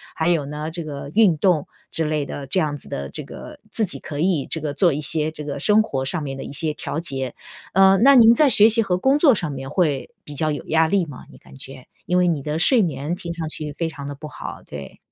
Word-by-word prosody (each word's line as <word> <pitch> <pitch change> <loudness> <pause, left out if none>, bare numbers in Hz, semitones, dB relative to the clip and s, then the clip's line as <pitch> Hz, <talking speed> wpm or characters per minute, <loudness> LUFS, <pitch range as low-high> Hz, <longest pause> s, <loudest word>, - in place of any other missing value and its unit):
还 160 - -1
有 165 -5 +1
呢 150 +2 -5
这 170 +1 -5
个 140 -2 -7
运 210 -6 +5
动 175 -4 +2 0.2
之 165 - -1
类 150 -2 -1
的 140 - -6
这 140 +8 0
样 150 -4 -1
子 - - -11
的 70 0 -5
这 - - -7
个， - - -11
自 225 - +1
己 185 - -5
可 145 -2 -7
以 165 -4 +1
这 160 - -2
个 145 -2 -4
做 175 -3 +3
一 150 - -3
些 155 0 +2
这 155 -1 -9
个 145 -1 -5
生 210 +8 +4
活 135 -11 -3
上 160 +4 -2
面 135 -2 -5
的 - - -6
一 - - -8
些 155 +2 0
调 160 - -4
节。 135 -6 -2 0.4
呃， 195 +1 +6
那 270 +7 +6
您 230 -2 +7
在 300 +4 +4
学 220 -4 +6
习 225 +1 +4
和 180 -3 -1
工 270 +5 +3
作 295 -3 +5
上 175 -7 -2
面 135 0 -7
会 150 - 0
比 145 - -9
较 155 +2 0
有 145 - -4
压 160 0 +2
力 190 -2 +2
吗？ 145 -4 -11
你 - - -15
感 - - -17
觉， 135 -1 -10 0.2
因 180 - +1
为 180 0 +3
你 160 -5 0
的 150 +3 -3
睡 235 +6 +5
眠 150 -1 -2
听 170 -1 -6
上 165 -2 -5
去 155 -1 -6
非 165 +3 -3
常 145 -3 -8
的 145 - -5
不 150 +2 -9
好， - - -8
对。 70 -1 -10
155 Hz, 285 characters per minute, -22 LUFS, 145-180 Hz, 0.4 s, 您